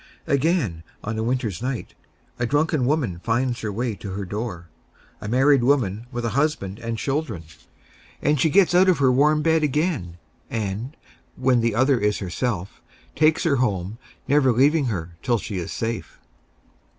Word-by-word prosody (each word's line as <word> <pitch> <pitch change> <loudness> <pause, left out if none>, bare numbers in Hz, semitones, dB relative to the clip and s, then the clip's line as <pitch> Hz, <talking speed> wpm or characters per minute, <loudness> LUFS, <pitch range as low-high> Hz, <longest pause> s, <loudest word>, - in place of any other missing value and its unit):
Again, 140 - +1 0.2
on 110 +1 -3
a - - -1
winter's 115 -5 -2
night, 130 -1 -4 0.5
a 120 - 0
drunken 145 -1 +1
woman 130 - 0
finds 120 +1 0
her 105 - -3
way 115 +3 -2
to 100 -2 -7
her 100 0 -4
door 100 -3 -5 0.5
a - - -6
married 130 +3 +4
woman 120 -5 +1
with 120 -2 -3
a - - +1
husband 120 -6 -1
and 115 -1 -4
children. 135 - -2 0.8
And 150 -1 +1
she 160 - +4
gets 185 +2 +4
out 185 +2 +5
of 180 - +4
her 135 -2 +4
warm 150 +4 +3
bed 160 -1 +3
again, 150 - -1 0.3
and, 110 +6 -4 0.4
when 130 -2 +2
the 115 -2 0
other 130 +1 +3
is 105 -1 +1
herself, 95 0 -3 0.3
takes 155 +1 +3
her 145 -5 +2
home, 105 -3 -1 0.3
never 140 -1 +4
leaving 140 +5 +3
her 85 -7 -4
till 120 -2 +1
she 100 -2 -5
is 85 - -5
safe. 115 0 -4
120 Hz, 165 wpm, -23 LUFS, 105-145 Hz, 0.8 s, out